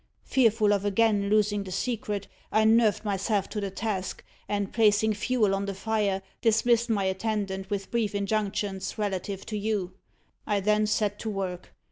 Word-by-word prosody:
"Fearful 220 -5 +3
of 200 -1 0
again 205 0 +2
losing 205 -1 +2
the 190 - -8
secret, 210 -1 -2 0.2
I 220 +1 +3
nerved 220 -2 +4
myself 200 0 0
to 210 - -3
the 200 - -2
task, 195 -1 -3 0.3
and 205 -1 -2
placing 215 -1 +4
fuel 215 -1 +1
on 195 0 -1
the 200 -1 -4
fire, 200 -2 0 0.2
dismissed 235 +1 +3
my 205 -3 +1
attendant 195 0 -2
with 200 -2 -3
brief 220 -4 0
injunctions 200 -1 -2
relative 195 -1 -3
to 215 - -4
you. 200 -4 -2 0.5
I 205 -2 +2
then 210 +2 +2
set 210 -1 0
to 220 - -3
work. 185 -3 -4
205 Hz, 160 wpm, -27 LUFS, 195-220 Hz, 0.5 s, nerved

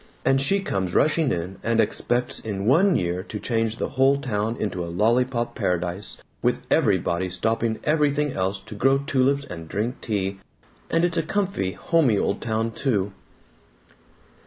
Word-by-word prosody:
And 135 +1 +4
she 195 +8 +2
comes 95 - -2
rushing 155 -2 +3
in, 90 +3 -3
and 115 0 +1
expects 120 +2 0
in 100 -3 -4
one 175 - +4
year 90 0 0
to 105 +2 -7
change 115 -1 0
the - - -3
whole 135 +1 +3
town 110 -3 -2
into 90 -4 -2
a 85 - -5
lollypop 120 +5 +1
paradise 90 +2 -2 0.2
with - - +1
everybody 90 +2 +2
stopping 110 +5 0
everything 150 -2 +1
else 95 +1 -1
to 95 - -10
grow 135 +6 +3
tulips 140 0 +1
and 85 - -8
drink 110 +5 -2
tea. 100 -3 -2 0.5
And 165 +1 +3
it's 170 -1 0
a - - +3
comfy 175 - -1
homey 145 -11 +2
old - - 0
town, 115 0 -1
too!" 105 -6 -1
115 Hz, 160 wpm, -24 LUFS, 95-135 Hz, 0.5 s, And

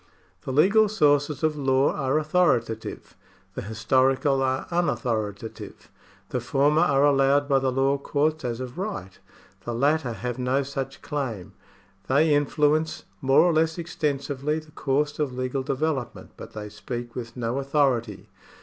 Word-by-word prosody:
The - - -3
legal 200 +10 +4
sources 145 -6 +2
of 155 -1 +2
law 135 -1 +2
are 135 0 0
authoritative, 150 -9 0 0.4
the - - -5
historical 130 +6 +1
are 130 0 0
unauthoritative. 115 - -2 0.5
The - - -1
former 145 +3 +2
are 140 0 +3
allowed 140 0 +3
by 135 -2 +3
the 130 -1 0
law 135 +2 +1
courts 155 +2 0
as 120 -1 -3
of 130 +5 -7
right; 190 - -5 0.4
the 120 - -4
latter 140 0 +1
have 125 +4 -5
no 130 +2 +1
such 135 0 -6
claim; 120 -11 -4 0.5
they 150 +3 +3
influence 150 +2 +1 0.2
more 135 +1 +5
or 175 0 +3
less 160 +1 +1
extensively 145 -3 -2
the 155 -1 -10
course 145 +1 -1
of 145 -4 -1
legal 130 +1 -2
development, 135 -1 -3
but - - -11
they 105 -1 -6
speak 120 +3 -6
with 115 -1 -7
no 120 +2 -2
authority. 135 -7 0
135 Hz, 145 wpm, -25 LUFS, 125-150 Hz, 0.5 s, more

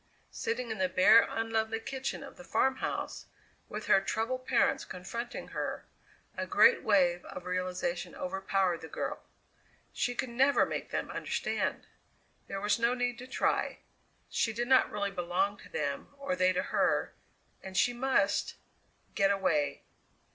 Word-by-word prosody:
Sitting 250 - -3
in 220 - -4
the 185 -1 +2
bare, 215 +6 +7
unlovely 225 0 -1
kitchen 265 +4 -4
of 275 - -11
the 180 - -12
farmhouse, 265 +9 -1 0.4
with - - -5
her 195 - +5
troubled 255 +6 -2
parents 245 - +3
confronting 190 +6 -6
her, - - -4 0.5
a - - -3
great 470 +1 +6
wave 180 -4 +3
of 175 - -8
realization 180 -1 -2
overpowered 190 -1 0
the 160 - -7
girl. - - -4 0.7
She 245 - -1
could 255 - -2
never 270 +4 +4
make - - -4
them - - -3
understand! - - -2 0.6
There 195 - -4
was 210 +3 +1
no 235 +2 +2
need 245 0 -1
to 255 - -8
try. 265 - 0 0.5
She 225 - 0
did 240 +2 -2
not 260 0 +5
really 200 -1 -2
belong 185 +2 0
to - - -14
them, 140 -2 -3
or 275 0 -2
they 185 -6 +3
to 180 - 0
her, - - +1 0.5
and 190 -1 -7
she 245 - +4
must 240 -5 +1 0.6
get 195 -2 +3
away! 155 -8 +1
210 Hz, 150 wpm, -31 LUFS, 185-245 Hz, 0.7 s, bare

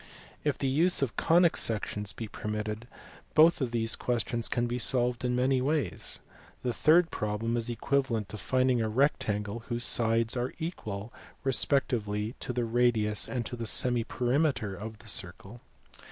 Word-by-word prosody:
If 145 -2 0
the - - -3
use 160 +4 +2
of 125 - -2
the - - -2
conic 170 0 +4
sections 105 -2 -1
be 115 - -6
permitted, 105 +2 -5 0.5
both 160 0 +6
of 130 - 0
these 115 -1 0
questions 120 -1 -1
can 120 -1 0
be 120 +1 -2
solved 125 0 +2
in 125 0 0
many 130 +1 +2
ways. 145 +2 -2 0.4
The 125 - -1
third 165 +7 +4
problem 105 +2 -2
is 120 0 -1
equivalent 120 -2 -1
to 110 - -7
finding 130 +3 +1
a 110 - -1
rectangle 110 -4 0
whose 120 0 0
sides 115 0 +3
are 125 +1 -2
equal 110 - -5 0.3
respectively 115 -5 0
to - - -4
the 120 -1 -1
radius 115 -2 +2
and 120 -3 -2
to 120 - -4
the 115 -1 -4
semiperimeter 125 -1 +1
of 110 +3 -8
the 110 - -17
circle. 100 +4 -2
120 Hz, 160 wpm, -29 LUFS, 110-130 Hz, 0.5 s, both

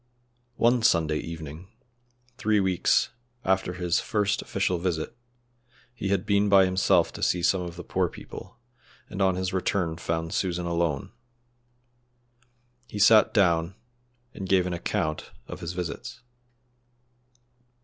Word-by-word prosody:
One 120 +1 +3
Sunday 80 -7 +2
evening 80 +1 -8 0.7
three 105 -2 +2
weeks 95 -2 +2 0.4
after 95 -1 +1
his 90 -2 0
first 105 -2 0
official 90 -2 -1
visit 85 -3 -2 0.8
he 110 -5 -4
had 95 -1 0
been 100 0 +2
by 100 -1 +7
himself 95 +1 +2
to - - -8
see 90 -1 +1
some 90 +1 +3
of 85 -1 -6
the 90 - -8
poor - - 0
people, 95 - -11 0.5
and 100 - -4
on 95 -1 +3
his 95 0 -2
return 90 -3 -1
found 80 -1 -3
Susan 90 -2 -1
alone. 85 -4 -1 1.8
He 105 - -8
sat 105 +1 +6
down 85 -3 +2 0.6
and 95 -2 -7
gave 95 -2 +4
an 90 - -2
account 85 -2 -2 0.2
of - - -8
his 85 -1 -5
visits. 90 +7 -6
90 Hz, 130 wpm, -26 LUFS, 85-100 Hz, 1.8 s, by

